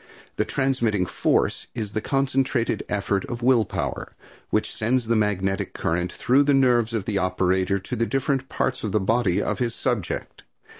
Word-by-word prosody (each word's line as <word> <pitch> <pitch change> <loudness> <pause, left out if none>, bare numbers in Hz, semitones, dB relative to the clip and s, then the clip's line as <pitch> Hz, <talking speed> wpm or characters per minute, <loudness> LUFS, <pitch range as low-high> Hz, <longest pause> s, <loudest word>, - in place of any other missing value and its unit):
The - - +1
transmitting 120 -8 0
force - - 0
is 110 -3 -4
the 110 - -1
concentrated 135 -2 0
effort 100 -1 0
of 120 0 -6
will 120 -3 +4
power, - - -4 0.3
which - - 0
sends 120 +3 0
the 115 +1 +1
magnetic 95 -3 0
current 85 +2 -1
through 130 +4 +3
the 145 -1 +3
nerves 120 -4 +3
of 105 -4 -2
the 100 -3 0
operator 95 +1 +1
to 100 +6 -5
the 115 0 0
different 135 -1 -1
parts 130 0 -1
of 105 - -2
the 105 - +3
body 100 -2 +1
of - - -1
his 120 -2 -1
subject. 120 -9 -3
115 Hz, 170 wpm, -24 LUFS, 100-130 Hz, 0.3 s, will